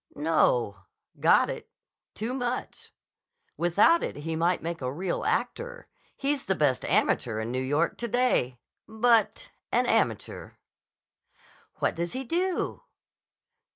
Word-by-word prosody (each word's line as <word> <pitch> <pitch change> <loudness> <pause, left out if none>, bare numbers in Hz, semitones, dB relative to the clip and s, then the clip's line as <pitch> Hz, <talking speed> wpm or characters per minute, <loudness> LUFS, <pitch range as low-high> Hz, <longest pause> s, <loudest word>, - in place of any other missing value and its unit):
"No. 120 - +1 0.3
Got - - +5
it. - - -8 0.5
Too 225 +4 -3
much. 250 -1 -4 0.6
Without 205 - +4
it - - -3
he 160 +3 -4
might 170 +2 +1
make 165 -1 -4
a 125 0 -2
real 175 +5 -3
actor. - - -2 0.3
He's 280 0 -1
the 190 - +1
best 145 -6 +1
amateur 110 -3 +1
in 110 +2 -3
New 130 +1 -1
York 145 +6 0
to 235 - -2
day. 235 - +1 0.3
But—an 220 -1 +1
amateur." - - -1 1.2
"What - - 0
does 170 +1 -3
he 260 +1 -3
do?" 355 +7 -1
175 Hz, 120 wpm, -27 LUFS, -, 1.2 s, Got